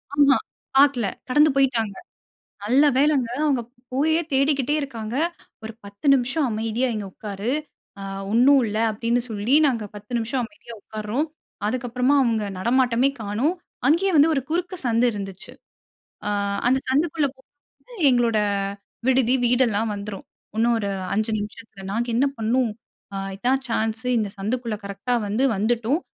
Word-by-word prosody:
ஆமா. 280 Hz, -2 st, +5 dB, 0.4 s
பார்க்கல. 275 Hz, -5 st, +5 dB, 0.2 s
கடந்து 295 Hz, +4 st, +5 dB
போயிட்டாங்க. 240 Hz, -7 st, +1 dB, 0.7 s
நல்ல 260 Hz, +7 st, +4 dB
வேலங்க 280 Hz, -4 st, +3 dB, 0.2 s
அவுங்க 275 Hz, -5 st, +2 dB, 0.3 s
போயே 315 Hz, +5 st, +2 dB
தேடிக்கிட்டே 275 Hz, 0 st, +2 dB
இருக்காங்க. 235 Hz, -4 st, -5 dB, 0.5 s
ஒரு 220 Hz, -, -5 dB
10 200 Hz, +7 st, -9 dB
நிமிஷம் 270 Hz, +3 st, +1 dB
அமைதியா 225 Hz, +3 st, -1 dB
இங்க 210 Hz, -2 st, -4 dB
உட்காரு! 205 Hz, +1 st, -4 dB, 0.5 s
ஆ -, -, -7 dB, 0.3 s
ஒண்ணும் 260 Hz, +3 st, +6 dB
இல்ல. 215 Hz, 0 st, -2 dB
அப்பிடின்னு 230 Hz, +3 st, 0 dB
சொல்லி 220 Hz, +5 st, 0 dB
நாங்க 235 Hz, -6 st, 0 dB
10 210 Hz, +3 st, -10 dB
நிமிஷம் 240 Hz, +3 st, -1 dB
அமைதியா 235 Hz, -2 st, -11 dB
உட்கார்றோம். 215 Hz, +9 st, -3 dB, 0.4 s
அதுக்கப்பறமா 250 Hz, +3 st, 0 dB
அவுங்க 225 Hz, -4 st, +1 dB
நடமாட்டமே 245 Hz, +4 st, +2 dB
காணோம். 225 Hz, -, 0 dB, 0.3 s
அங்கேயே 360 Hz, +6 st, +3 dB
வந்து 300 Hz, +2 st, +6 dB
ஒரு 275 Hz, -, +1 dB
குறுக்கு 355 Hz, +3 st, -1 dB
சந்து 235 Hz, +1 st, +3 dB
இருந்துச்சு. 195 Hz, -2 st, -7 dB, 0.7 s
ஆ -, -, 0 dB, 0.4 s
அந்த 260 Hz, -, +3 dB
சந்துக்குள்ள 300 Hz, +1 st, +2 dB
போக 265 Hz, -, -24 dB, 0.6 s
எங்களோட 240 Hz, -3 st, +2 dB, 0.7 s
விடுதி, 260 Hz, -1 st, +3 dB
வீடெல்லாம் 230 Hz, -3 st, +2 dB
வந்துரும். 200 Hz, -1 st, -7 dB, 0.3 s
இன்னும் 235 Hz, +1 st, +3 dB
ஒரு 200 Hz, -1 st, -2 dB, 0.2 s
5 215 Hz, +2 st, 0 dB
நிமிஷத்தில. 205 Hz, -1 st, -8 dB
நாங்க 235 Hz, +3 st, -1 dB
என்ன 270 Hz, +4 st, +3 dB
பண்ணோம்? 230 Hz, +1 st, +1 dB, 0.4 s
அ -, -, -3 dB, 0.2 s
இதான் 260 Hz, +6 st, +1 dB
சான்ஸ் 225 Hz, +1 st, -1 dB
இந்த 215 Hz, -, -1 dB
சந்துக்குள்ள 230 Hz, +2 st, -2 dB
கரெக்ட்டா 200 Hz, +5 st, -2 dB
வந்து 215 Hz, +5 st, 0 dB
வந்துட்டோம். 235 Hz, -, +1 dB
240 Hz, 135 wpm, -23 LUFS, 215-270 Hz, 0.7 s, ஒண்ணும்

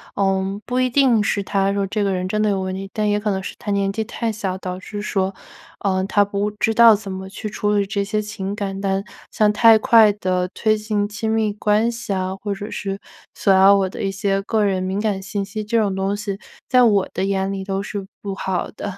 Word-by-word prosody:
呃， 195 Hz, 0 st, 0 dB
不 250 Hz, +1 st, -1 dB
一 255 Hz, 0 st, +2 dB
定 250 Hz, -4 st, +4 dB
是 200 Hz, 0 st, 0 dB
他 195 Hz, 0 st, +1 dB
说 200 Hz, -1 st, 0 dB
这 205 Hz, +2 st, -1 dB
个 200 Hz, -, +1 dB
人 185 Hz, -1 st, -2 dB
真 215 Hz, +3 st, -1 dB
的 215 Hz, -, +2 dB
有 195 Hz, -1 st, 0 dB
问 185 Hz, 0 st, -3 dB
题， 195 Hz, +1 st, -6 dB
但 215 Hz, -1 st, 0 dB
也 205 Hz, 0 st, +1 dB
可 210 Hz, 0 st, -2 dB
能 190 Hz, -, -2 dB
是 -, -, -6 dB
他 -, -, -7 dB
年 200 Hz, -1 st, +1 dB
纪 220 Hz, -, -1 dB
太 230 Hz, +1 st, -3 dB
小， 195 Hz, -3 st, -3 dB
导 185 Hz, -1 st, -5 dB
致 205 Hz, +2 st, -7 dB
说， 195 Hz, -2 st, -1 dB, 0.5 s
呃， 190 Hz, -2 st, +1 dB
他 205 Hz, +1 st, +3 dB
不 200 Hz, +1 st, -1 dB
知 215 Hz, +1 st, 0 dB
道 230 Hz, -1 st, +8 dB
怎 200 Hz, -1 st, -7 dB
么 190 Hz, 0 st, -6 dB
去 210 Hz, -, -6 dB
处 210 Hz, 0 st, -1 dB
理 200 Hz, -1 st, +2 dB
这 200 Hz, 0 st, -1 dB
些 210 Hz, +2 st, -1 dB
情 205 Hz, -2 st, -5 dB
感。 195 Hz, -2 st, -4 dB
但 195 Hz, 0 st, 0 dB, 0.3 s
像 210 Hz, -1 st, +3 dB
太 225 Hz, +1 st, +7 dB
快 220 Hz, -1 st, +6 dB
地 185 Hz, -3 st, -1 dB
推 215 Hz, -1 st, +2 dB
进 210 Hz, -1 st, -1 dB
亲 215 Hz, +1 st, -4 dB
密 220 Hz, -2 st, +1 dB
关 210 Hz, +2 st, +1 dB
系 230 Hz, -3 st, -6 dB
啊， 185 Hz, 0 st, -2 dB
或 200 Hz, +1 st, -4 dB
者 205 Hz, +2 st, -7 dB
是 195 Hz, 0 st, -4 dB, 0.4 s
索 195 Hz, -, +3 dB
要 190 Hz, +1 st, +7 dB
我 195 Hz, -1 st, +2 dB
的 -, -, -7 dB
一 195 Hz, -, 0 dB
些 195 Hz, 0 st, 0 dB
个 215 Hz, +2 st, 0 dB
人 190 Hz, -2 st, 0 dB
敏 190 Hz, +2 st, -2 dB
感 205 Hz, -3 st, -1 dB
信 200 Hz, +1 st, -3 dB
息， 215 Hz, +2 st, -5 dB
这 230 Hz, +3 st, 0 dB
种 200 Hz, -3 st, 0 dB
东 195 Hz, +1 st, -1 dB
西 200 Hz, -1 st, -4 dB, 0.3 s
在 255 Hz, -2 st, +4 dB
我 205 Hz, -5 st, +4 dB
的 -, -, -2 dB
眼 195 Hz, 0 st, 0 dB
里 195 Hz, -1 st, -4 dB
都 195 Hz, 0 st, -2 dB
是 200 Hz, -1 st, -5 dB, 0.2 s
不 200 Hz, -1 st, -3 dB
好 190 Hz, -2 st, -3 dB
的。 200 Hz, -2 st, -6 dB
200 Hz, 265 characters per minute, -21 LUFS, 195-215 Hz, 0.5 s, 道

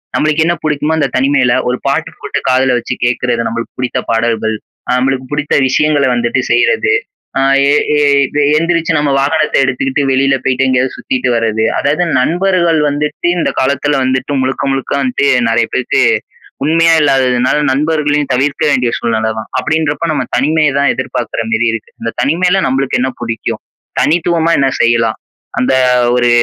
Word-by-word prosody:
நம்மளுக்கு 155 Hz, +1 st, +1 dB
என்ன 175 Hz, -, +2 dB
புடிக்குமோ 150 Hz, +1 st, 0 dB
அந்த 140 Hz, -, +1 dB
தனிமையில, 135 Hz, -2 st, +2 dB, 0.2 s
ஒரு 125 Hz, -, -1 dB
பாட்டு -, -, -1 dB
போட்டு -, -, -3 dB
காதுல 130 Hz, 0 st, +2 dB
வச்சு 120 Hz, -, -5 dB
கேக்குறது 120 Hz, -1 st, 0 dB
நம்பளுக்கு 115 Hz, +1 st, -6 dB
புடித்த 125 Hz, 0 st, -1 dB
பாடல்கள். 115 Hz, -1 st, 0 dB, 0.3 s
அ -, -, -1 dB
நம்பளுக்கு 130 Hz, 0 st, -1 dB
புடித்த 145 Hz, 0 st, -1 dB
விஷயங்கள 150 Hz, +1 st, +2 dB
வந்துட்டு 120 Hz, +2 st, 0 dB
செய்றது. 120 Hz, -, +2 dB, 0.5 s
அ -, -, +2 dB, 0.3 s
எ -, -, +4 dB, 0.2 s
எ -, -, +2 dB, 0.6 s
எந்திரிச்சு 165 Hz, 0 st, 0 dB
நம்ம 150 Hz, -1 st, 0 dB
வாகனத்தை 150 Hz, +3 st, +1 dB
எடுத்துகிட்டு 135 Hz, +2 st, -1 dB
வெளியில 135 Hz, +1 st, +2 dB
போய்ட்டு, 130 Hz, 0 st, +1 dB
எங்கயாவது 130 Hz, 0 st, 0 dB
சுத்திட்டு 130 Hz, -1 st, -2 dB
வரது. 110 Hz, -1 st, 0 dB
அதாவது 155 Hz, +5 st, 0 dB
நண்பர்கள் 170 Hz, +2 st, +1 dB
வந்துட்டு 150 Hz, +3 st, -2 dB
இந்த -, -, 0 dB
காலத்துல 140 Hz, +2 st, 0 dB
வந்துட்டு 130 Hz, +2 st, -1 dB
முழுக்க, 130 Hz, +1 st, -2 dB
முழுக்க 135 Hz, -1 st, -3 dB
வந்துட்டு 135 Hz, +1 st, 0 dB, 0.2 s
நெறைய 115 Hz, 0 st, +2 dB
பேருக்கு 130 Hz, -, 0 dB, 0.6 s
உண்மையா 165 Hz, +2 st, +3 dB
இல்லாததுனால, 130 Hz, -3 st, +2 dB, 0.2 s
நண்பர்களையும் 150 Hz, 0 st, 0 dB
தவிர்க்க 140 Hz, +3 st, -1 dB
வேண்டிய 125 Hz, -3 st, +1 dB
சூழ்நிலை 110 Hz, -1 st, -1 dB
தான். 110 Hz, -, -7 dB
அப்படீன்றப்ப, 155 Hz, +3 st, -1 dB
நம்ம -, -, -1 dB
தனிமைய 150 Hz, +1 st, +1 dB
தான் 140 Hz, -, +3 dB
எதிர்பாக்கற 120 Hz, -3 st, -3 dB
மாரி 115 Hz, +1 st, +1 dB
இருக்கு. 115 Hz, -, -7 dB
"இந்த 115 Hz, 0 st, -3 dB
தனிமைல 180 Hz, +5 st, +1 dB
நம்பளுக்கு 130 Hz, -1 st, 0 dB
என்ன 130 Hz, +1 st, 0 dB
புடிக்கும்? 115 Hz, -1 st, -4 dB, 0.4 s
தனித்துவமா 170 Hz, 0 st, +1 dB
என்ன 135 Hz, -1 st, +2 dB
செய்யலாம்? 115 Hz, -1 st, +1 dB, 0.4 s
அந்த 125 Hz, +1 st, +1 dB, 0.4 s
ஒரு 120 Hz, 0 st, +2 dB
135 Hz, 150 wpm, -13 LUFS, 125-150 Hz, 0.6 s, எ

